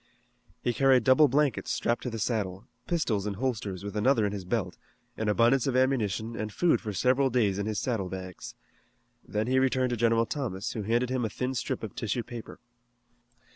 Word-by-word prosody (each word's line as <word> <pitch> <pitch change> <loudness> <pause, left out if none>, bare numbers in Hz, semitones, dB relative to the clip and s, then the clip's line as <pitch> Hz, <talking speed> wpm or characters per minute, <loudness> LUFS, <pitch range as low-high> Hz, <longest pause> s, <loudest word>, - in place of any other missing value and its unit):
He 120 - +1
carried 135 -1 +4
double 130 +6 +6
blankets 145 +1 +1
strapped 120 - 0
to 125 - -3
the 115 - -5
saddle, 100 -4 -2 0.2
pistols 115 - 0
in 100 - -3
holsters 105 -5 -3
with 100 0 -6
another 115 +1 +3
in 100 - -1
his 100 -3 -5
belt, 95 -3 -2 0.4
an 110 -1 -1
abundance 120 +5 +3
of 130 - 0
ammunition, 115 -4 0
and 110 -1 -4
food 175 +9 +2
for 110 - -4
several 130 +7 +2
days 105 -6 +1
in 100 - -2
his 110 -1 -2
saddle 105 -7 -1
bags. 95 -1 -7 0.7
Then 105 +1 -2
he 130 +2 +2
returned 130 -1 +1
to - - +1
General 115 0 +3
Thomas, 110 -9 -3
who 110 - -4
handed 120 +4 0
him 130 -1 0
a 110 - -1
thin 125 +5 -3
strip 115 - -3
of 110 - -5
tissue 115 +2 -2
paper. 120 -2 -9
115 Hz, 195 wpm, -28 LUFS, 105-130 Hz, 0.7 s, double